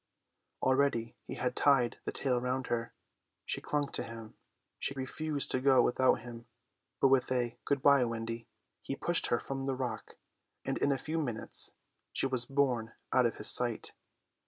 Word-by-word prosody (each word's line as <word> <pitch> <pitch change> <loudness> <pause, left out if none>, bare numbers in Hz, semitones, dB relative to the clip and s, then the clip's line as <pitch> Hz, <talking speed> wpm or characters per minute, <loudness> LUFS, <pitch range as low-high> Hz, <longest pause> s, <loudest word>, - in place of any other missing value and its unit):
Already 130 -4 +2
he - - -5
had 125 - -1
tied 135 -5 +3
the - - -1
tail 125 -3 0
round 130 +1 -1
her. 115 0 -2 0.5
She - - -2
clung 145 -1 -1
to - - -1
him; 115 -1 -8 0.5
she 140 - -2
refused 140 +2 -3
to 130 - 0
go 135 -1 +5
without 130 -1 +3
him; 120 0 -9 0.5
but 135 - +5
with 130 -1 +3
a 120 -2 0
"Good 140 -2 0
bye, 140 -2 +6
Wendy," 115 0 -4 0.3
he - - -4
pushed - - +1
her - - +2
from 135 0 -4
the 135 - 0
rock; 130 -2 -4 0.5
and - - -1
in 140 - +3
a 135 - +2
few 155 +5 -2
minutes 120 -7 -2 0.4
she - - +1
was 130 -3 -1
borne 125 -5 +1 0.2
out 125 -2 +5
of 115 - -4
his 105 - +3
sight. 120 -2 0
130 Hz, 175 wpm, -32 LUFS, 120-135 Hz, 0.5 s, bye